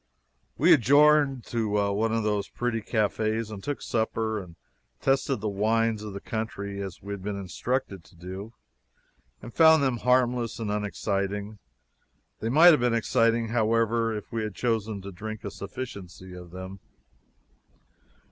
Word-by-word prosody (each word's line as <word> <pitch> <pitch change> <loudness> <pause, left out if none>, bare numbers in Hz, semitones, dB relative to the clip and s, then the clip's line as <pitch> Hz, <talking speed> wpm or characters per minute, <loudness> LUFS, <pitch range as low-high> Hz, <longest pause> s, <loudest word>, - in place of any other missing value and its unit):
We 170 +4 +6
adjourned 145 -1 +4
to 115 -2 0 0.2
one 110 +2 0
of 115 0 0
those 105 -2 -1
pretty 120 -2 -2
cafes 110 0 -1
and 100 -2 -8
took 145 -1 -4
supper 110 -1 -1
and 85 -3 -13 0.4
tested 135 -3 +1
the 110 - -2
wines 110 +2 +1
of 105 -2 -7
the 100 - -5
country, 100 -2 -4
as 95 -3 -7
we 100 0 -5
had 100 - -7
been 100 +1 -3
instructed 100 0 -3
to - - -20
do, 95 +6 -8 0.9
and 120 - -9
found 160 -2 +6
them 130 -3 +1
harmless 125 -1 +1
and 110 -3 -3
unexciting. 105 0 -2 0.8
They 115 - -2
might 160 +7 +8
have 155 - +4
been 120 -1 +2
exciting, 115 -1 +2
however, 115 0 +1
if 105 - -9
we 115 - -2
had 105 -3 -4
chosen 110 -4 -1
to 100 - -7
drink 110 +4 -7
a 100 - -5
sufficiency 95 -3 -8
of 90 -1 -10
them. 95 +2 -8
110 Hz, 155 wpm, -27 LUFS, 100-120 Hz, 0.9 s, might